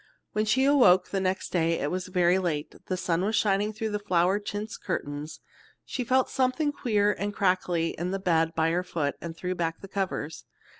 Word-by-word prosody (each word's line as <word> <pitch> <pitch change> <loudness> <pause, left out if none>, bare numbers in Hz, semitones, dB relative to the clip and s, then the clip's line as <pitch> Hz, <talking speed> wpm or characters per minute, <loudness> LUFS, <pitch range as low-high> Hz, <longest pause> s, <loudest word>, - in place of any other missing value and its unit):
When 215 +1 0
she 260 +5 +3
awoke 245 -12 +5
next 190 -1 -1
day 165 -2 +2
it 145 - -1
was 185 0 -3
very 180 0 +3
late, 160 -5 -2
and - - -18
the 185 - -1
sun 175 -1 0
was 215 +3 0
shining 205 0 +2
through 220 0 -4
the 210 - -1
flowered 190 +1 +1
chintz 210 +2 -4
curtains. 145 +2 -5 0.4
She 255 - -3
felt 255 +2 +2
something 265 +3 +1
queer 210 -7 +1
and 205 +1 -4
crackly 180 -3 +1
in 175 +2 -4
the 195 - -1
bed 165 -3 +1
by 160 0 +2
her 175 +2 +1
foot, 155 -5 -2
and 165 -1 -7
threw 180 +1 -2
back 165 -2 -2
the 195 - -10
covers. 190 -6 -3
185 Hz, 200 wpm, -27 LUFS, 170-210 Hz, 0.4 s, awoke